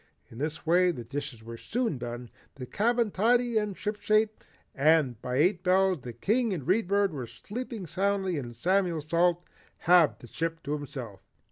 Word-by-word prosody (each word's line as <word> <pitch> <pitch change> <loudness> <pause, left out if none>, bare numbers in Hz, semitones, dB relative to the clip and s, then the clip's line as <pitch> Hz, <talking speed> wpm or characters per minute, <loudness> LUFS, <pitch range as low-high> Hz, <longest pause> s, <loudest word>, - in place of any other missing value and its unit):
In 115 - -10
this 150 +2 -3
way 180 +2 +4
the 140 -9 -4
dishes 135 -1 -6
were 115 +1 -8
soon 230 - -2
done, 120 0 -6 0.2
the 130 - -7
cabin 230 - +1
tidy 235 +3 +2
and 210 -3 -4
shipshape, 215 +1 0 0.3
and 140 -5 +3
by 125 - -3
eight 175 +6 +3
bells 185 -3 +3
the 120 - -7
King 215 - 0
and 160 -7 -4
the - - -14
Read 195 +3 +2
Bird 200 -2 +2
were 130 -5 -5
sleeping 210 - -7
soundly 190 -1 0
and 120 -3 -7
Samuel 180 +4 +1
Salt 170 +3 +1 0.3
had 175 -3 +4
the - - -13
ship 165 +6 -4
to 145 - -3
himself. 130 - -6
170 Hz, 175 wpm, -28 LUFS, 135-200 Hz, 0.3 s, way